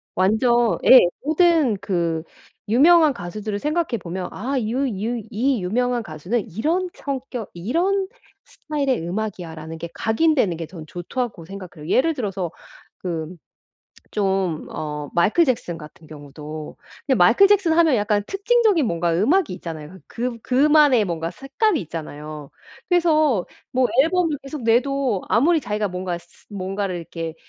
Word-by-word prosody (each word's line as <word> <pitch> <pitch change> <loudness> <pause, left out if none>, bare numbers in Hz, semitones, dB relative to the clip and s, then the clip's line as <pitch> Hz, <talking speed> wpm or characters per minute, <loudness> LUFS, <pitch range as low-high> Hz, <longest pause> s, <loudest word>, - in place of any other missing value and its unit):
완전 230 +5 +3
예 260 - +10 0.2
모든 315 - +3
그 170 -5 -1 0.5
유명한 310 +6 +6
가수들을 205 +1 -5
생각해 305 -2 -1
보면 180 +1 -5
'아 265 +7 -3
유 250 +6 -1
유 225 +2 -3
이 240 0 0
유명한 240 +5 0
가수는 195 +7 -3
이런 325 - -1
성격 260 -5 -5
이런 350 - 0 0.4
스타일의 280 - -2
음악이야.'라는 170 -5 -5
게 170 +1 -6
각인되는 220 - +2
게 165 - -5
저는 165 -3 -10
좋다고 180 +1 -4
생각해요. 180 -4 -9
예를 325 - +3
들어서 195 - -3 0.5
그 170 -1 -4 0.8
좀 190 -5 0
어 150 -1 -5
마이클 205 - +4
잭슨 230 - -1
같은 155 +1 -13
경우도 150 +1 -9 0.3
근데 270 - +3
마이클 230 - +6
잭슨 390 -5 +3
하면 325 -4 +4
약간 205 -1 +1
특징적인 410 - +2
뭔가 170 -1 0
음악이 285 - +2
있잖아요. 165 0 -8
그 245 +2 -2
그 230 - -10
그만의 280 -1 +4
뭔가 165 -2 -3
색감이 280 - 0
있잖아요. 150 -2 -8 0.4
그래서 310 - +3 0.3
뭐 255 0 +3 0.2
앨범을 330 -2 +1
계속 275 -1 -7
내도 245 -2 +1
아무리 310 +8 +3
자기가 210 -3 -2
뭔가 180 -1 -3
스 175 - -20
스 - - -25
뭔가를 195 -1 -3
이렇게 165 -1 -6
220 Hz, 310 characters per minute, -22 LUFS, 175-280 Hz, 0.8 s, 예